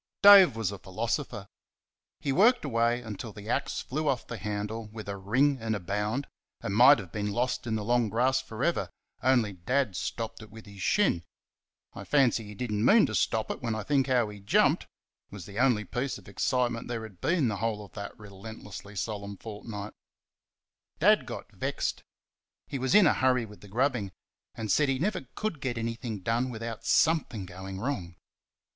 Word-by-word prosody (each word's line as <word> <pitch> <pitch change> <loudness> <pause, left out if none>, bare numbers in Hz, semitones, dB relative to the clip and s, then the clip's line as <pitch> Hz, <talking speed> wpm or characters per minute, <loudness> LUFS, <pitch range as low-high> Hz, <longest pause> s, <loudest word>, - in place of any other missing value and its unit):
Dave 195 - +9
was 110 -4 -1
a 100 - -7
philosopher. 115 - -3 0.7
He 140 - -1
worked 225 - +4
away 120 -1 +1
until 110 0 -6
the 105 +1 -11
axe - - -1
flew 155 +4 -3
off 125 -3 -1
the 120 - -7
handle 105 +1 -4
with 110 0 -9
a 100 - -3
ring 130 +9 +2
and 110 -1 -1
a - - -3
bound, 105 +9 -2 0.3
and 100 - -4
might 125 +6 +8
have 95 -6 -8
been 105 -1 -2
lost 125 +2 -1
in 110 - 0
the 110 - -2
long 120 0 +2
grass 130 +4 +2
for 120 -1 -6
ever 170 - +1 0.3
only 120 -5 +3
Dad 110 +4 0
stopped 115 +5 -4
it 110 - -11
with 110 +1 -12
his 100 -2 -11
shin. 135 - +2 0.7
I - - -8
fancy 130 -6 +2
he 105 0 -9
did 120 +2 -4
n't 105 0 0
mean 210 - +6
to - - -4
stop 110 -1 +1
it - - -6
when 115 -3 -1
I 110 - -3
think 140 0 +2
how 125 -4 +2
he 105 -1 -9
jumped 100 - +3
it - - -34 0.4
was 100 -4 -9
the 100 +2 -7
only 120 -5 +3
piece 125 +8 -3
of 100 - -16
excitement 120 +3 0
there 115 -2 -3
had 100 -5 -11
been 165 - +2
the 105 -3 -1
whole 105 -1 -2
of - - -18
that 100 -1 -7
relentlessly 105 0 -10
solemn 100 0 -4
fortnight. 105 -1 -7 1.0
Dad - - +4
got - - -7
vexed - - -2 0.6
he 135 - -5
was 130 +1 +1
in 210 -3 +8
a 155 - +5
hurry 125 -2 +2
with 105 -1 -14
the 105 - -12
grubbing 120 -2 0 0.4
and 110 -3 -3
said 145 +6 +3
he 135 - +1
never 175 - -2
could 210 -10 -3
get 125 -3 -2
anything 115 -2 -4
done 115 +6 0
without 115 -1 -6
something 145 - +2
going 95 +1 -8
wrong. 100 -8 -3
115 Hz, 195 wpm, -29 LUFS, 105-130 Hz, 1.0 s, Dave